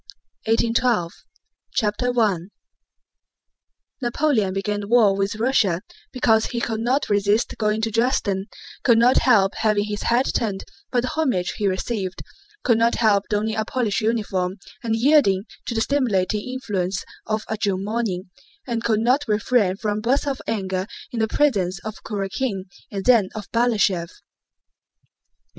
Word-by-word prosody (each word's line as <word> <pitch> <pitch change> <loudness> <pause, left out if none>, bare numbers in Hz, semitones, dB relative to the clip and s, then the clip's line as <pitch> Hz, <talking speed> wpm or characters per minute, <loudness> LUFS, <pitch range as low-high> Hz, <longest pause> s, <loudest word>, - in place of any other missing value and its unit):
BOOK 225 +1 +4
TEN: 235 - +1
1812 215 -9 +1 0.6
CHAPTER 245 +3 0
I 210 -5 +3 1.6
Napoleon 240 -5 +1
began 205 +2 -2
the 200 - -6
war 220 -4 +5
with 195 +2 -1
Russia 215 -6 +1 0.3
because 225 -4 +3
he 235 - -3
could 225 -2 -2
not 250 +5 +1
resist 205 +2 +1
going 215 0 +1
to 225 0 -1
Dresden, 210 -4 0 0.4
could 235 -2 +5
not 245 +3 +5
help 200 -6 +4
having 215 -2 +2
his 205 0 -4
head 240 +3 +2
turned 205 -4 -1 0.3
by 245 - +2
the 255 - -2
homage 255 - 0
he 205 - 0
received, 190 0 -3 0.4
could 230 -3 +3
not 230 +1 +3
help 205 -3 +3
donning 215 +1 0
a 220 - 0
Polish 230 -2 -1
uniform 205 -5 -1 0.3
and 225 -2 0
yielding 225 -6 +4 0.2
to 235 - -3
the 225 - +1
stimulating 215 -5 0
influence 195 -8 -3 0.2
of 215 0 -1
a 220 - -2
June 200 -3 -1
morning, 205 -5 -2 0.3
and 235 -3 -3
could 220 -2 +1
not 255 +5 +3
refrain 210 -2 +2
from 210 0 -2
bursts 255 +6 +1
of 275 -2 -2
anger 190 -3 -2 0.2
in 235 - -3
the 220 - +2
presence 200 -10 +1
of 215 -1 -6
Kurákin 200 0 -3 0.3
and 195 -1 -4
then 230 -7 +5
of 210 -2 -7
Balashëv. 210 -7 +1
220 Hz, 150 wpm, -22 LUFS, 195-235 Hz, 1.6 s, war